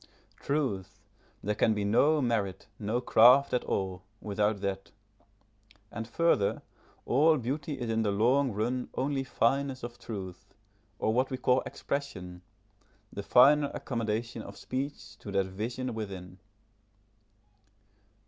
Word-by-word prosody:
Truth! 135 -11 -2 0.4
there 105 - 0
can 110 +1 +2
be 105 -1 -1
no 145 +8 +3
merit, 105 -6 -1
no 110 +3 -1
craft 125 +4 +6
at 125 - +1
all, 95 -1 -2 0.2
without 105 0 0
that. 95 -1 -3 1.0
And 115 0 -5
further, 120 -6 +1 0.4
all 155 +5 +4
beauty 140 +3 -3
is 120 - -3
in 115 0 +1
the 105 - +1
long 125 +7 +2
run 120 +5 -2
only 135 0 -1
fineness 135 +1 0
of 120 0 -7
truth, 95 -5 -8 0.4
or 110 - 0
what 130 +3 +2
we 130 - -3
call 125 0 +2
expression, 95 -11 -5 0.7
the 100 - -4
finer 140 +7 +5
accommodation 115 -1 -3
of 100 -1 -10
speech 130 -5 -5
to 100 - -8
that 95 -1 +2
vision 115 +6 -4
within. 95 -4 -7
115 Hz, 130 wpm, -30 LUFS, 100-130 Hz, 1.0 s, craft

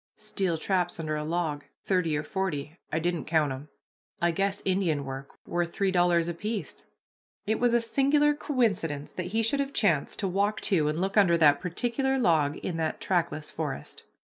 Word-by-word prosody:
"Steel 195 -5 -2
traps, 175 0 -1
under 155 -1 -2
a 150 - -2
log, 155 -2 -2 0.2
thirty 175 -5 +1
or 150 - -2
forty, 160 -6 -3 0.2
I - - 0
didn't 170 -1 -1
count 155 -3 +2
'em. 135 +3 -7 0.5
I 170 0 +2
guess 195 +3 -1
Indian 180 -7 +1
work 135 0 -7
worth 175 0 -1
three 195 -1 +1
dollars 175 -2 +3
apiece." 205 +5 -4 0.6
It 220 +1 0
was 240 -1 +3
a 240 - +4
singular 280 +5 +3
coincidence 200 - -1
that 180 -1 -4
he 225 +4 0
should 255 +6 +2
have 280 0 -1
chanced 170 -10 +1
to 195 - -1
walk 200 +3 0
to 160 -6 +2
and 155 +2 -1
look 195 +3 -1
under 180 -5 +5
that 145 -3 +5
particular 245 - 0
log 160 - +2
in 170 - -2
that 160 -1 -2
trackless 165 -4 -1
forest. 70 +2 -5
175 Hz, 180 wpm, -28 LUFS, 155-205 Hz, 0.6 s, under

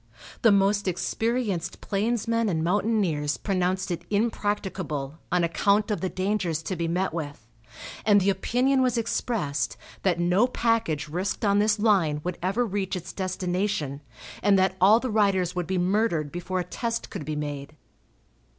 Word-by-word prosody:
The 225 - +6
most 200 0 +3
experienced 190 +1 -1
plainsmen 230 +2 0
and 160 -3 0
mountaineers 180 -6 +1
pronounced 185 -1 -1
it 170 0 -3
impracticable, 190 -9 -2
on 180 -1 +2
account 200 +5 +2
of 210 - -1
the 190 - -1
dangers 185 -4 -1
to 185 - -3
be 170 -1 -2
met 180 +2 -1
with, 145 -9 -6 0.6
and 205 -1 +5
the 195 +1 +3
opinion 250 +8 +1
was 250 -2 +2
expressed 140 - -1 0.2
that 180 -3 +1
no 180 +7 +3
package 225 - 0
risked 185 +7 -2
on 200 0 +3
this 210 0 +3
line 190 -9 +2
would 180 0 -4
ever 195 +7 +1
reach 195 -3 -2
its 180 +1 -6
destination, 180 -6 -2 0.4
and 200 -1 +4
that 190 0 +2
all 210 +5 +7
the 255 -1 -3
riders 195 -4 +2
would 180 -2 -2
be 190 0 -1
murdered 180 -5 +1
before 180 +1 -3
a - - 0
test 230 +6 -4
could 190 -7 -5
be 155 +1 -4
made. 145 0 -5
190 Hz, 160 wpm, -26 LUFS, 170-210 Hz, 0.6 s, all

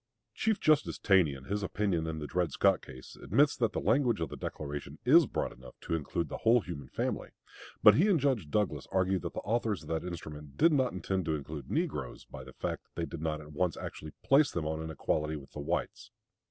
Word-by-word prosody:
Chief 220 -2 0
Justice 155 -2 +3
Taney, 90 -8 +4
in 65 - -11
his 100 +7 -2
opinion 95 -4 -1
in 80 -1 -3
the 75 - -4
Dred 85 0 0
Scott - - +3
case, 65 0 -11
admits 145 0 +3
that 115 -4 +1
the - - -1
language 125 -7 +2
of 80 -3 -2
the - - -6
Declaration 70 0 -6
is 155 +3 +7
broad - - -2
enough 65 0 -14
to - - -4
include 80 +1 -1
the - - -5
whole 115 +1 +4
human 70 -8 -7
family; - - -2 0.5
but 105 - +10
he 170 - +4
and 190 -6 +4
Judge 130 - 0
Douglas 105 +5 0
argue 95 0 +2
that 85 0 -5
the - - -3
authors 110 -2 -1
of - - -11
that 80 -1 -1
instrument 75 -5 -8
did 165 +1 +5
not 130 -3 +2
intend 95 0 -2
to 80 -2 0
include 75 -2 -7
negroes, - - -2
by - - -9
the - - -12
fact - - -3
that - - -41
they 85 - -1
did 80 - -7
not 80 -1 -2
at 75 0 -12
once 90 +2 0
actually 75 0 -7
place 140 +1 +5
them 80 -3 -3
on 80 +1 -2
an 80 - -5
equality 75 0 -1
with 70 -2 -10
the - - -8
whites. 70 - -3
85 Hz, 230 wpm, -31 LUFS, 75-110 Hz, 0.5 s, but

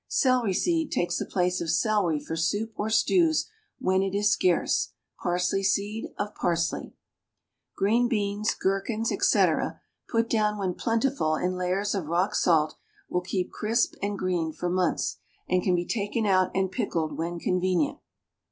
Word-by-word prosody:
Celery 250 -8 +2
seed 330 - +1
takes 175 - 0
the - - -3
place 180 -1 0
of 165 - -3
celery 175 -2 +2
for 150 +2 -5
soup 205 +7 -1
or 210 - -2
stews 320 - +3 0.3
when 190 0 +1
it 195 0 -1
is 205 +1 +3
scarce; 180 -2 +1 0.3
parsley 180 +2 0
seed 200 +3 0
of 205 0 -3
parsley. 170 -1 -1 0.8
Green 230 +5 +3
beans, 210 -2 0
gherkins, 215 +4 -1
etc., - - +2 0.3
put 230 0 +1
down 210 -2 +1
when 190 -3 -1
plentiful 230 - 0
in 180 +3 -1
layers 185 +3 -1
of 190 -7 -3
rock 175 +5 +1
salt, 155 -3 +3 0.4
will 180 - 0
keep 185 0 -2
crisp 225 +2 0
and 200 0 -2
green 175 -4 -1
for 175 +3 -3
months, 180 -1 0 0.3
and 185 0 +2
can 180 0 +2
be 175 0 -1
taken 215 +1 -1
out 185 -2 +3
and 190 -1 +1
pickled 160 -3 -2
when 170 +2 -3
convenient. 180 -2 0
190 Hz, 155 wpm, -27 LUFS, 180-215 Hz, 0.8 s, stews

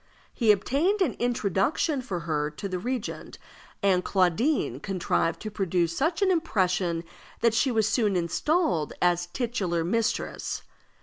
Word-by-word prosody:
He 225 -4 +4
obtained 285 - +1
an 290 - 0
introduction 245 - 0
for 190 -9 -4
her 150 -2 -1
to 155 +7 -6
the 185 -1 -3
regent, 245 +3 -4 0.5
and 185 -2 +3
Claudine 185 - +1
contrived 180 -1 -1
to 215 - -5
produce 175 -4 0
such 325 - +1
an 380 - +4
impression 185 - 0 0.4
that 230 -1 +4
she 245 +4 +2
was 220 -3 +2
soon 210 -4 +1
installed 180 - 0
as 175 0 +2
titular 190 -7 -1
mistress. 225 +6 -1
200 Hz, 135 wpm, -27 LUFS, 175-250 Hz, 0.5 s, He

